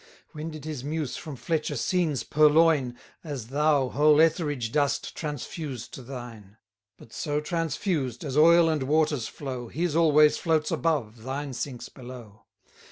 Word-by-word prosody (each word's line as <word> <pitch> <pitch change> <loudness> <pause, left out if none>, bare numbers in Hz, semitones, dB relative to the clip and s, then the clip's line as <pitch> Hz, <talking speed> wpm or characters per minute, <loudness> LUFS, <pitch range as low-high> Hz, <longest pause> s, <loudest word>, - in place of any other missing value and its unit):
When 155 +1 -6
did 155 -2 -9
his 150 -5 -5
muse 150 -1 -3
from 155 -4 -7
Fletcher 155 +2 -2
scenes 160 +1 0
purloin, 150 -4 +3 0.3
As 140 -8 -6
thou 145 -1 +2
whole 150 +2 +4
Etheridge 150 -7 +1
dost 145 0 0
transfuse 145 -3 -5
to - - -9
thine? 120 -5 -10 0.4
But 115 - -16
so 150 -1 -1
transfused, 155 - -2
as 140 -3 -4
oil 165 +2 +6
and 155 -3 0
waters 150 -2 +1
flow, 130 -4 -6
His 165 +4 -2
always 150 -2 +5
floats 160 -2 +1
above, 125 -9 -1
thine 135 +3 -4
sinks 125 -1 -5
below. 120 -5 -12
145 Hz, 145 wpm, -26 LUFS, 130-155 Hz, 0.4 s, oil